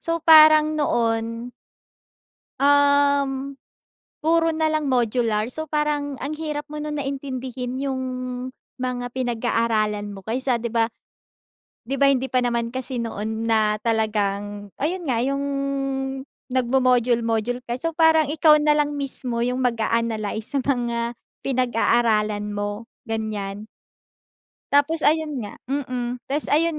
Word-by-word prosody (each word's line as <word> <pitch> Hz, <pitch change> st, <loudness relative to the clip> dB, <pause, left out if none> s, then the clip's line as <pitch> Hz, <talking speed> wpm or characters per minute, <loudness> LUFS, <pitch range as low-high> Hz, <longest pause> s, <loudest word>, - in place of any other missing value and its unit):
So, 330 Hz, 0 st, -1 dB
parang 310 Hz, -1 st, +7 dB
noon 230 Hz, -1 st, -1 dB, 1.1 s
um, 280 Hz, -1 st, +3 dB, 0.6 s
puro 330 Hz, +1 st, +2 dB
na 315 Hz, 0 st, +1 dB
lang 310 Hz, -1 st, 0 dB
modular. 230 Hz, -2 st, +1 dB
So, 315 Hz, +5 st, -4 dB
parang 295 Hz, -2 st, -1 dB
ang 300 Hz, +3 st, -4 dB
hirap 300 Hz, -2 st, -4 dB
mo 300 Hz, -, -7 dB
nun 300 Hz, -1 st, -3 dB
na 275 Hz, -, -4 dB
intindihin 260 Hz, -2 st, -5 dB
yung 265 Hz, -2 st, -2 dB, 0.7 s
mga 250 Hz, -1 st, -3 dB
pinag-aaralan 225 Hz, -4 st, 0 dB
mo 195 Hz, -, -9 dB
kaysa 250 Hz, +2 st, 0 dB
'di 235 Hz, 0 st, -3 dB
ba 230 Hz, -1 st, +2 dB, 1.0 s
'di 270 Hz, -, -2 dB
ba 280 Hz, -, +5 dB
hindi 265 Hz, -1 st, +1 dB
pa 255 Hz, -1 st, +2 dB
naman 235 Hz, -1 st, -1 dB
kasi 260 Hz, 0 st, -2 dB
noon 220 Hz, 0 st, -4 dB
na 215 Hz, -2 st, +2 dB
talagang 205 Hz, -2 st, -1 dB
ayun 350 Hz, +4 st, -1 dB
nga, 235 Hz, -, +1 dB
yung 275 Hz, +2 st, -1 dB, 1.1 s
nagmo-module-module 245 Hz, -2 st, +1 dB
ka. 240 Hz, -, -2 dB
So, 330 Hz, +5 st, -2 dB
parang 320 Hz, -2 st, +4 dB
ikaw 305 Hz, 0 st, +5 dB
na 300 Hz, -, +4 dB
lang 295 Hz, 0 st, 0 dB
mismo 255 Hz, -4 st, 0 dB
yung 250 Hz, +1 st, -1 dB
mag-a-analize 225 Hz, -2 st, -1 dB
sa -, -, +2 dB
mga 240 Hz, -3 st, -1 dB, 0.3 s
pinag-aaralan 230 Hz, -5 st, +1 dB
mo, 205 Hz, +2 st, -4 dB, 0.2 s
ganiyan. 215 Hz, -3 st, -4 dB, 1.1 s
Tapos 295 Hz, +3 st, +3 dB
ayun 310 Hz, 0 st, +2 dB
nga, 205 Hz, -, -9 dB
mm. 250 Hz, -3 st, -3 dB
Tapos 295 Hz, +2 st, +1 dB
ayun 315 Hz, +1 st, +2 dB
250 Hz, 125 wpm, -23 LUFS, 230-285 Hz, 1.1 s, parang